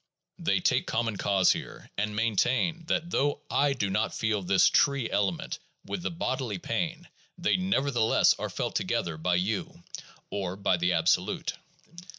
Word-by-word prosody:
They - - +1
take - - +1
common 115 -2 -1
cause 95 -1 +3
here, - - -6
and 105 +1 -2
maintain 130 - +1
that 170 +2 -1
though 145 +1 +1
I 140 0 +3
do 110 -7 -1
not 95 +1 -1
feel 110 -2 0
this 95 +1 +4
"tree" 140 -5 +3
element 95 -4 -1 0.3
with 180 - -4
the - - -2
bodily 130 - -2
pain, 170 - -3 0.3
they 175 - +2
nevertheless 140 - +3
are - - -3
felt - - -3
together 85 -2 -1
by 90 +3 +1
you, 95 +4 -2 0.5
or 95 -2 -3
by 95 -2 +1
the 90 +1 +1
absolute. 80 -1 +1
110 Hz, 155 wpm, -28 LUFS, 95-140 Hz, 0.5 s, this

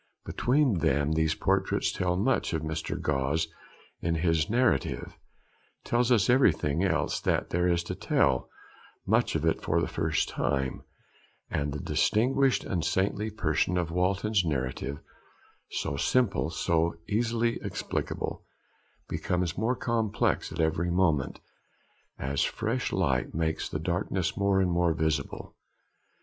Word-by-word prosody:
Between 130 - +2
them 75 -2 +1
these 80 0 +1
portraits 95 0 +1
tell 90 -1 0
much, 105 0 +1
and 80 -1 -1
Mr. 80 0 -3
Gosse, 70 +4 0 0.5
in 85 0 -1
his 80 -1 +1
narrative, 115 - +1 0.7
tells 120 +1 +1
us 110 -6 +4
everything 85 - +3
else 80 -6 +1
that - - 0
there 90 +1 +2
is 85 -1 +1
to - - -4
tell, - - +1 0.6
much 110 +1 +2
of 80 0 0
it 80 - +1
for 85 - +1
the 85 - 0
first 80 -1 0
time; 65 -2 -1 0.7
and 75 -1 -1
the 75 - -4
distinguished 130 - +2
and 90 -4 -2
saintly 95 +5 0
person 90 -3 0
of 85 -2 -1
Walton's 95 +3 +1
narrative, 70 -2 -2 0.7
so 70 - -3
simple, 120 - +1
so 85 0 0
easily 115 +2 0
explicable, - - -3 0.6
becomes 90 -2 -1
more 115 +5 0
complex 115 -4 0
at - - -7
every 80 +2 +1
moment, 85 -7 +1 0.8
as 70 +1 -1
fresh 115 +4 -1
light 70 -10 0
makes 80 -1 -1
the - - -3
darkness 90 +2 -1
more 100 -1 +2
and 90 -1 +1
more 85 -1 +2
visible. 80 -3 -2
85 Hz, 135 wpm, -28 LUFS, 80-105 Hz, 0.8 s, us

